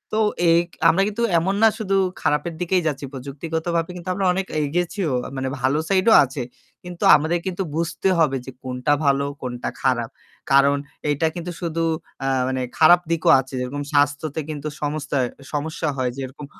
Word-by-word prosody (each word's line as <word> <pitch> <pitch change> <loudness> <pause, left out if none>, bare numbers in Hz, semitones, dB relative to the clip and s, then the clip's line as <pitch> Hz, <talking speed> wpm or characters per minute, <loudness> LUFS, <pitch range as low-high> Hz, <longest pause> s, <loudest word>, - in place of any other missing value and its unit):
তো - - +2 0.3
এই 165 +1 +6 0.3
আমরা 195 - +3
কিন্তু 220 +3 -2 0.2
এমন 190 +4 0
না 225 - +8
শুধু 195 -3 -1 0.3
খারাপের 150 +3 0
দিকেই 180 +1 +1
যাচ্ছি। 145 -1 -2
প্রযুক্তিগতভাবে 160 +5 -3
কিন্তু 180 +1 -7
আমরা 195 +1 -1
অনেক 190 +1 -2 0.2
এগিয়েছিও। 175 0 -1 0.2
মানে 130 0 -2
ভালো 135 +4 +2
side 190 +2 +2
ও - - +8
আছে। 130 -1 -4 0.4
কিন্তু 175 -1 -7
আমাদের 160 +4 +1
কিন্তু 190 +1 -2
বুঝতে 170 +3 0
হবে 140 -4 +3
যে 130 - -7
কোনটা 125 +2 0
ভালো 140 0 +3 0.2
কোনটা 125 -1 -4
খারাপ। 120 -3 +1 0.4
কারণ 140 +1 +5 0.3
এইটা 145 +2 +1
কিন্তু 175 0 -5
শুধু 165 -1 -2 0.4
আ - - 0 0.2
মানে 130 0 -1 0.2
খারাপ 175 +2 +7
দিকও 165 -1 +1
আছে। 130 +1 -7
যেরকম 140 +3 -3
স্বাস্থ্যতে 145 +2 +1
কিন্তু 150 0 -5
সমস্তা 145 -1 -2 0.4
সমস্যা 155 +2 -2
হয়। 125 -1 0
যেরকম 135 +2 -7
155 Hz, 165 wpm, -22 LUFS, 140-175 Hz, 0.4 s, না